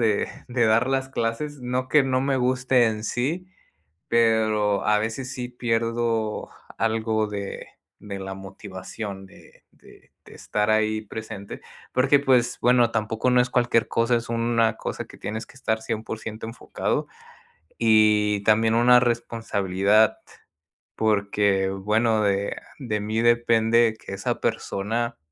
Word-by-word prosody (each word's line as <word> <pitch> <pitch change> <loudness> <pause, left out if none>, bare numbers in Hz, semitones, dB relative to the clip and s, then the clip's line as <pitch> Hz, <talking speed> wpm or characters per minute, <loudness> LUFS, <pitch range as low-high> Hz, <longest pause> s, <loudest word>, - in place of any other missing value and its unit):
de 110 -3 +1 0.2
de 120 -1 +1
dar 115 +4 +3
las 135 0 0
clases, 130 +5 -3
no 125 +1 -2
que 150 +1 +5
no 130 -1 +1
me 135 -1 +1
guste 125 -1 +2
en 110 -1 -2
sí, 160 +12 -2 0.6
pero 110 -3 +2
a 105 0 +3
veces 120 +4 -4
sí 125 -1 -5
pierdo 115 -2 -1 0.3
algo 110 -1 0
de 100 -1 -6 0.3
de 100 -2 -7
la 95 0 -5
motivación 95 +1 -8
de 95 - -19
de - - -20
de - - -14
estar 105 0 -1
ahí 110 0 +1
presente 110 -1 -8 0.3
porque, 135 +3 +4
pues, 125 -3 +2
bueno, 120 -1 +4
tampoco 110 +2 -1
no 125 - +4
es 125 - -2
cualquier 120 -2 +2
cosa, 115 +1 +1
es 115 - -2
una 115 -1 +1
cosa - - -5
que - - -15
tienes 110 +2 -5
que - - -18
estar 110 -4 -2
100% 110 0 -5
enfocado 115 - -3 0.7
y 105 -2 +3
también 110 +1 +3
una 125 +1 +6
responsabilidad, 110 -3 +1 0.8
porque, 100 -2 +1
bueno, 110 +3 +1
de 100 0 0 0.2
de 110 -6 -3
mí 110 +2 -1
depende 115 -1 +3
que - - -9
esa 95 - -3
persona 115 +4 -2
110 Hz, 135 wpm, -24 LUFS, 105-120 Hz, 0.8 s, una